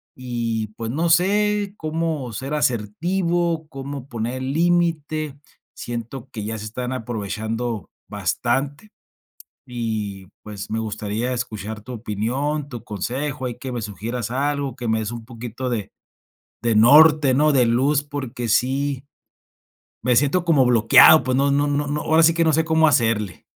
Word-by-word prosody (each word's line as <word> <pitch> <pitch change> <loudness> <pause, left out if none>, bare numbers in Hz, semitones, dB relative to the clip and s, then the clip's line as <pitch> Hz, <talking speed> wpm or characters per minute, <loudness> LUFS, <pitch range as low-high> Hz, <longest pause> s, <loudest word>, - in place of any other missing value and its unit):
y 115 -3 -3
pues 115 -1 -4
no 160 +7 0
sé 205 +3 +2
cómo 155 -5 -3
ser 135 +7 -4
asertivo, 165 - 0
cómo 135 -1 -7
poner 120 +2 -4
límite. 155 -1 0 0.4
Siento 120 +2 -6
que 110 -5 -6
ya 110 +2 -4
se 110 - -7
están 125 +3 -4
aprovechando 115 -2 -4 0.2
bastante 145 +9 -2 0.8
y, 110 -6 -4 0.2
pues, 105 -2 -8
me 110 - -2
gustaría 110 +2 -3
escuchar 110 -3 -4
tu 125 +4 -9
opinión, 125 +7 -2
tu 120 -5 -8
consejo, 130 +7 -4
ahí 120 -2 -3
que 130 - -6
me 120 -1 -3
sugieras 110 +3 -4
algo, 140 0 -1
que 120 -3 -4
me 110 0 +1
des 110 0 -3
un 115 -1 -7
poquito 120 +1 -6
de 110 -5 -3 0.7
de 115 -1 +1
norte, 145 +4 +7
¿no? 150 +3 +4
De 130 -3 +4
luz 135 +5 +2
porque 130 -5 -5
sí 135 +4 +1 1.0
me 125 +1 +3
siento 145 +7 +2
como 155 -6 +4
bloqueado, 120 +5 +7
pues 130 +1 0
no 140 +1 +2
no 145 +1 +2
no 145 0 0
no 145 +1 -2
ahora 160 +1 +3
sí 165 0 +5
que 165 0 +2
no 160 - +3
sé 160 +2 +2
cómo 160 0 +3
hacerle. 110 - 0
130 Hz, 155 wpm, -22 LUFS, 115-150 Hz, 1.0 s, norte